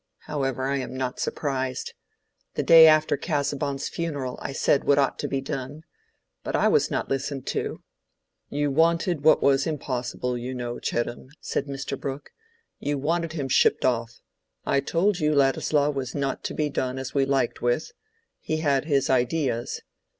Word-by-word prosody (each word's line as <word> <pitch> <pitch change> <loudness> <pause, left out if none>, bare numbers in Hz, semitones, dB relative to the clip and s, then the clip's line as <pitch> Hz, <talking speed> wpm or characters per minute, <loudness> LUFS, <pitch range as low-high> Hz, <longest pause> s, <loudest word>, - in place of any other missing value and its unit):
However, 135 -3 -2
I 140 +1 0
am 130 -1 -5
not 130 -1 -3
surprised. 130 -3 -2 0.6
The - - 0
day 165 -1 +9
after 155 -1 +4
Casaubon's 145 -3 -2
funeral 145 -7 -4
I - - -4
said 135 +1 +2
what 140 - +3
ought 140 -2 +1
to - - -2
be 135 - -2
done. 135 +3 -5 0.6
But - - -2
I - - +3
was - - +3
not - - -2
listened 135 0 -3
to." - - -3 0.7
"You 145 0 0
wanted 165 +1 +2
what 155 - +5
was 140 +1 +3
impossible, 125 -4 -3
you 125 +2 -5
know, 120 -1 -4
Chettam," 120 +1 -3
said 140 - -3
Mr. 140 0 -4
Brooke. 140 +1 -6 0.5
"You 145 0 -1
wanted 165 +3 -1
him 145 -5 -3
shipped 130 - +3
off. 120 -2 -1 0.4
I 140 - +2
told 175 +7 +1
you 150 0 +2
Ladislaw 140 +1 +2
was 130 -3 -4
not 140 -2 -2
to - - -3
be 150 - 0
done 130 0 -2
as 130 -1 -5
we 140 - +3
liked 135 -3 0
with: 120 +5 0 0.5
he 155 - -2
had 145 -3 +1
his 140 -4 +2
ideas. 125 -1 0
140 Hz, 165 wpm, -25 LUFS, 130-150 Hz, 0.7 s, day